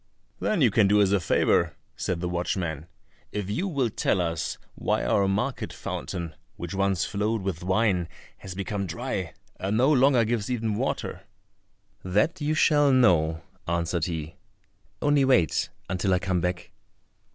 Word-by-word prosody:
"Then 205 -6 0
you 120 -5 +5
can 105 -1 +4
do 105 +1 +4
us 100 -2 +4
a 100 - +3
favour," 85 - +2 0.2
said 85 -2 -2
the 90 - -1
watchman, 85 -3 -2 0.4
"if 100 -1 -3
you 175 - -1
will 135 - 0
tell 100 - +1
us 85 -2 -2 0.2
why - - -1
our 95 +11 +2
market 105 +7 -1
fountain, 85 -4 -5 0.2
which 85 +2 -6
once 95 -1 +1
flowed 105 +1 -1
with 90 -3 -3
wine 95 -2 +1 0.3
has 95 -2 -8
become 100 0 -3
dry, - - -4 0.2
and 100 +3 -1
no 130 +5 +4
longer 130 -4 +4
gives 110 -1 -1
even 115 -3 -1
water?" 110 -6 -2 0.8
"That 105 - +1
you 150 +1 0
shall 145 -2 +4
know," 85 -10 +3 0.2
answered 85 0 0
he; 80 -3 -5 0.7
"only 145 -1 +4
wait 95 - +3 0.2
until 95 0 +1
I - - +3
come 90 -1 0
back." 90 0 -3
100 Hz, 155 wpm, -26 LUFS, 90-120 Hz, 0.8 s, you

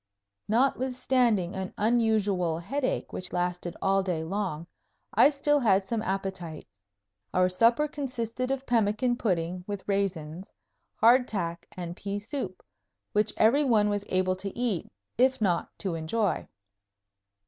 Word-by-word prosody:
Notwithstanding 250 -4 +1
an 190 -1 -5
unusual 210 -7 +2
headache 260 +10 -2
which 185 - -5
lasted 180 0 -2
all 195 0 +3
day 180 -4 -2
long, 175 -3 -3 0.5
I - - +7
still 295 0 +2
had 200 -6 +3
some 220 +3 -2
appetite. 190 -5 -4 0.7
Our 185 0 +4
supper 230 +10 +3
consisted 255 -4 -3
of 270 0 -2
pemmican 235 +1 +2
pudding 180 -4 -1
with 205 -2 -5
raisins, 185 -4 -2 0.4
hard 245 +3 +5
tack 170 -5 -3
and 175 -1 -5
pea 200 +1 -4
soup, 250 +7 -5 0.5
which 210 +1 +2
every 255 +7 +4
one 220 -6 +3
was 205 -1 -1
able 185 0 +1
to 195 +1 -3
eat, 235 -8 -1 0.3
if 260 +1 +4
not 180 -6 +1
to 190 -4 -2
enjoy. 165 +4 -1
205 Hz, 130 wpm, -28 LUFS, 180-240 Hz, 0.7 s, I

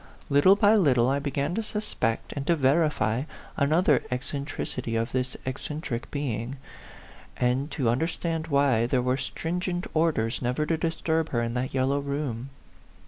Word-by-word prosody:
Little 145 +8 +6
by 205 +1 +5
little 135 - +4
I 140 +1 +1
began 140 +2 -1
to 225 - 0
suspect 210 - -2
and 140 -1 -5
to 170 - +4
verify 135 -5 +2 0.3
another 150 -1 +3
ec 125 0 -1
centricity 130 -4 -3
of 115 +2 -2
this 130 0 -2
eccentric 130 -2 -4
being, 130 -3 -3 0.8
and 125 +4 +1
to 135 -7 -1
un 120 +2 +2
derstand 165 -1 -2
why 140 -6 +3
there 125 0 +1
were 125 +1 +2
stringent 175 +6 -3
orders 155 -8 +1
never 125 +5 0
to 165 - +1
disturb 160 0 -1
her 120 -2 0
in 115 0 -2
that 125 +2 -2
yellow 135 +2 +2
room. 140 -3 -3
140 Hz, 155 wpm, -27 LUFS, 125-160 Hz, 0.8 s, Little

